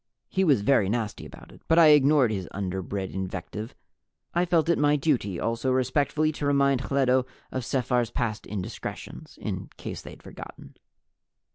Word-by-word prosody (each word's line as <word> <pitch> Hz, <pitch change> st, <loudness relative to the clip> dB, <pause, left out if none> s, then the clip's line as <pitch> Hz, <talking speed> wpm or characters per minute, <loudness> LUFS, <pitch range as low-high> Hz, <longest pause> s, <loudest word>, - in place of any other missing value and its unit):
He 190 Hz, -, +1 dB
was 140 Hz, -, +4 dB
very 105 Hz, -3 st, +3 dB
nasty 110 Hz, -1 st, -3 dB
about -, -, -14 dB
it, -, -, -16 dB
but 160 Hz, -, +3 dB
I 165 Hz, -2 st, +8 dB
ignored 145 Hz, -4 st, +5 dB
his 95 Hz, -4 st, -3 dB
underbred 95 Hz, 0 st, -4 dB
invective. 95 Hz, +3 st, -5 dB, 0.6 s
I 175 Hz, +1 st, +2 dB
felt 170 Hz, -2 st, +2 dB
it 170 Hz, -, +2 dB
my 145 Hz, 0 st, +4 dB
duty 130 Hz, -, 0 dB
also 115 Hz, +3 st, -1 dB
respectfully 145 Hz, +4 st, +1 dB
to 150 Hz, -1 st, -5 dB
remind 140 Hz, -2 st, +3 dB
Hledo 130 Hz, -2 st, +2 dB, 0.2 s
of 130 Hz, -, -3 dB
Sephar's 125 Hz, -2 st, 0 dB
past 110 Hz, -3 st, -3 dB
indiscretions, 100 Hz, -3 st, -7 dB
in -, -, -4 dB
case -, -, -6 dB
they'd -, -, -12 dB
forgotten. -, -, -11 dB
130 Hz, 155 wpm, -26 LUFS, 105-145 Hz, 0.6 s, I